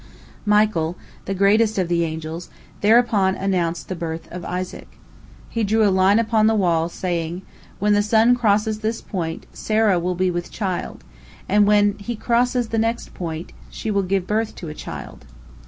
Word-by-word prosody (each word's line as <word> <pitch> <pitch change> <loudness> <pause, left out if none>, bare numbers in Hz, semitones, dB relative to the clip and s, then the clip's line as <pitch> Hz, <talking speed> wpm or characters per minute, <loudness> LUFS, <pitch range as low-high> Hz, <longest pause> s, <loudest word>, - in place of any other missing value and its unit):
Michael, 210 -6 +2 0.3
the 195 - -2
greatest 210 +3 +3
of 185 -2 +1
the 170 0 +1
angels, 160 +1 -5 0.3
thereupon 210 -3 +4
announced 180 -3 -1
the 185 - -4
birth 165 -1 -5
of 180 0 -6
Isaac. 180 +1 -5 0.6
He 230 - -2
drew 215 +1 +3
a - - +3
line 190 +2 +4
upon 225 -1 +3
the 220 - +3
wall, 170 -5 +2
saying, 175 0 -3 0.3
"When 210 +1 +2
the 205 - +4
sun 220 +3 +4
crosses 215 -2 +1
this 220 +1 -2
point, 165 -4 -4
Sarah 215 -4 +2
will 180 +1 -1
be 185 +1 +1
with 175 0 -4
child, 190 -4 -4 0.4
and 205 +1 +4
when 205 -1 +3
he 235 +4 -4
crosses 240 +1 +1
the 225 - 0
next 230 +1 -2
point, 165 -2 -5 0.2
she 220 - -4
will 200 -1 +2
give 190 -1 -1
birth 215 +2 -1
to 165 - -7
a - - -6
child." 75 - -9
195 Hz, 170 wpm, -22 LUFS, 175-220 Hz, 0.6 s, thereupon